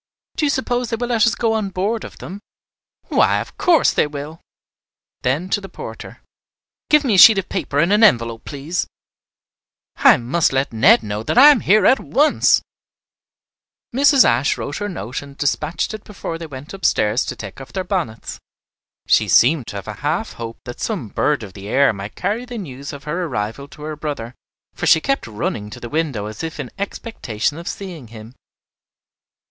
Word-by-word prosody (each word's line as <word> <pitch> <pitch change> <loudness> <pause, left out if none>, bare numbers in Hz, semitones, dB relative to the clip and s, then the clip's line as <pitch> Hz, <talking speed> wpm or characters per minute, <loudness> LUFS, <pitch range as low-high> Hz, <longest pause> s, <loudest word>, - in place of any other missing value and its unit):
Do 300 - +1
you - - +1
suppose 250 -3 -1
they - - -1
will 240 +2 -4
let 235 -1 +3
us 230 - +1
go 225 -1 0
on 215 -3 -1
board 200 +5 -2
of - - -10
them?" 195 +3 -8 0.7
"Why, - - +3
of - - -8
course 340 -4 +4
they - - +2
will." 150 +2 -8 0.8
Then 140 +8 0
to 205 - 0
the 195 - -9
porter, - - -9 0.7
"Give 300 0 +5
me 250 -6 +1
a - - +3
sheet 220 +1 +10
of 195 -1 -2
paper 140 - -3
and 170 +7 +3
an 210 +2 +4
envelope, 115 - +3
please. 150 +5 -4 1.1
I - - +6
must 125 +8 +1
let 135 -2 0
Ned 110 0 +5
know 105 0 -4
that 115 - -2
I 280 +4 +10
am 280 - +3
here 205 0 +3
at 265 - +5
once." 300 +2 +3 1.3
Mrs. 275 0 +6
Ashe 120 +4 +2
wrote 145 - -5
her 205 0 -3
note 130 - -5
and 140 -1 -13
despatched 150 +7 -1
it 215 -1 -8
before 175 -5 -6
they 165 - -7
went 140 +2 -10
upstairs 115 - +1
to - - -5
take 100 +5 -9
off 135 - -11
their 190 - -3
bonnets. 175 - -4 0.7
She - - +3
seemed 130 0 +4
to - - -7
have 100 - -7
a 110 - -4
half 160 +9 -1
hope 115 -1 -7
that 120 - -8
some 185 - -3
bird 145 +4 0
of 100 -3 -10
the 100 0 -10
air 135 +2 +3
might 100 +1 -8
carry 210 +6 -2
the 245 -1 -7
news 140 - -7
of 145 -2 -10
her 170 +4 -3
arrival 120 0 -4
to 150 - -13
her 155 0 -5
brother, 145 -6 -5 0.4
for - - -3
she - - +6
kept 275 - -1
running 105 -1 -4
to 105 - -10
the 120 - -8
window 145 -9 -2
as 110 0 -7
if 160 -1 -5
in 135 -4 -5
expectation 155 - -3
of 170 - -9
seeing 175 -10 -7
him. 110 +1 -12
150 Hz, 195 wpm, -20 LUFS, -, 1.3 s, sheet